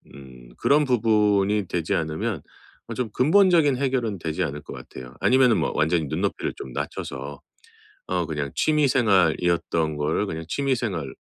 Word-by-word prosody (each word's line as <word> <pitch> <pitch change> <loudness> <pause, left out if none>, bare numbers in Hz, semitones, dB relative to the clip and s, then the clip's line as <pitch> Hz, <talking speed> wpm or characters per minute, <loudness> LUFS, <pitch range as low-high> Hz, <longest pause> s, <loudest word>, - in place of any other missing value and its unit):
음 65 -3 -13
그런 150 +1 +3
부분이 105 -5 +2
되지 85 -2 -1
않으면 80 -1 -2 0.5
어 - - -5
좀 125 -3 -2
근본적인 160 -2 +4
해결은 125 -7 -1
되지 80 +2 -2
않을 75 -1 -4
것 - - -9
같아요. 65 0 -10
아니면은 130 -2 +4
뭐 - - 0
완전히 80 +1 +1
눈높이를 70 - -2
좀 65 - -8
낮춰서 70 +2 -6 0.7
어 90 -2 -1
그냥 75 -3 -3
취미 150 -2 +2
생활이었던 85 -8 +2
거를 75 +7 0
그냥 80 -2 -5
취미 140 +3 0
생활인 90 - -4
90 Hz, 335 characters per minute, -24 LUFS, 75-125 Hz, 0.7 s, 근본적인